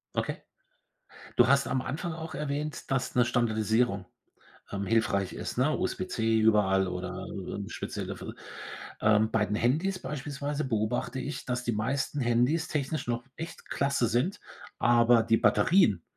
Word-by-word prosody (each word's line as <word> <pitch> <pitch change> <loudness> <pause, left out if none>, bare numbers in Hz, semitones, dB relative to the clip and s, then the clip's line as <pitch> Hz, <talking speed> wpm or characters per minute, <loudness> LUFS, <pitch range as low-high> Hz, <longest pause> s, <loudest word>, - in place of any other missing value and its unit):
Okay. - - -1 1.0
Du 120 - +6
hast 140 +1 +4
am 130 +1 0
Anfang 160 +7 -3
auch 160 0 -7
erwähnt, 150 +1 -3
dass 135 -1 0
'ne 125 - +5
Standardisierung, 110 -3 +1 0.7
ähm, 100 0 -2
hilfreich 100 -3 +1
ist, - - -5
ne, 135 +5 +2
USB-C 115 -12 0
überall, 100 -3 +4
oder 90 0 -4
eben - - -5
speziell - - -5
dafür. - - -6 0.7
Ähm, 110 0 +4
bei 110 -1 +2
den 105 - -2
Handys 160 - +1
beispielsweise 145 +1 -3
beobachte 120 +2 -1
ich, 145 +4 -5
dass 125 0 -2
die 120 - 0
meisten 135 +6 -1
Handys 125 +7 +2
technisch 150 0 -2
noch 120 0 -1
echt 165 +1 -8
klasse 140 -4 +1
sind, 125 - 0 0.4
aber 120 -1 +5
die 115 0 +3
Batterien 165 - +4
125 Hz, 145 wpm, -29 LUFS, 110-145 Hz, 1.0 s, Du